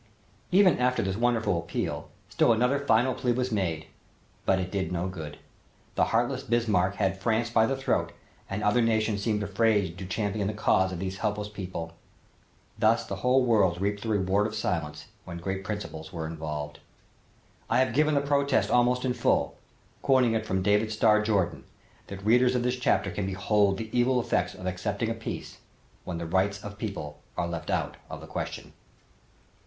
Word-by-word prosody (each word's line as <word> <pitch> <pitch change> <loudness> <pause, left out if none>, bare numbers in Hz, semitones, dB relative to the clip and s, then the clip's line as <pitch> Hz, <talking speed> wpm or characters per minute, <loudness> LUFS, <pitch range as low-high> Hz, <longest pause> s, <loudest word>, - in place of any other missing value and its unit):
Even 185 -5 +5
after 125 -1 +2
this 95 0 -1
wonderful 115 -5 +1
appeal, 85 - -4 0.2
still - - +3
another 125 +5 +2
final 130 -1 +3
plea 125 0 0
was 125 +1 -1
made, 85 -7 -1 0.6
but 95 - +4
it 90 -1 -3
did 95 -2 -2
no 90 +1 -1
good. 80 -5 -7 0.6
The - - +3
heartless - - 0
Bismarck 105 -5 +1
had 95 -2 0
France 115 +2 +1
by 110 -1 +4
the 135 - 0
throat 135 - 0 0.4
and 100 +2 -3
other 105 +4 +3
nations 110 -2 +1
seemed 105 0 0
afraid 100 -3 +1
to 95 - -6
champion 100 +1 -1
the 105 - -3
cause 95 -3 +2
of 90 - -4
these 95 +1 -4
helpless 105 -1 -2
people. 90 -5 -6 0.9
Thus - - +3
the - - -5
whole 130 +1 +3
world 100 -7 +3
reaped 100 +1 -1
the 115 - -4
reward 100 0 +2
of 110 - -7
silence 85 -8 -2 0.2
when 85 - -7
great 95 +2 -4
principles 95 -7 -6
were 80 -3 -4
involved. 75 -2 -5 0.9
I - - +3
have 130 -2 +2
given 150 +3 +3
the 140 - +3
protest 140 -1 +1
almost 125 +1 +3
in 125 - +1
full, - - +1 0.5
quoting 130 -4 +3
it 110 -1 -1
from 95 0 0
David 105 +2 +2
Starr 105 0 +4
Jordan, 95 -6 0 0.4
that 100 0 -8
readers 125 +3 +4
of 125 - +1
this 125 +1 0
chapter 125 - +1
can 100 -2 -3
behold 100 +1 +2
the 110 +2 -6
evil 125 +1 +3
effects 90 -6 0
of 90 - -9
accepting 100 +5 -2
a - - 0
peace 115 0 -6 0.5
when 90 - -4
the 85 - -4
rights 95 +4 +1
of 100 0 -8
people 75 -9 -5 0.2
are 85 - 0
left 85 -1 -5
out - - -1
of - - -6
the - - -10
question. - - -6
105 Hz, 180 wpm, -28 LUFS, 95-120 Hz, 0.9 s, Even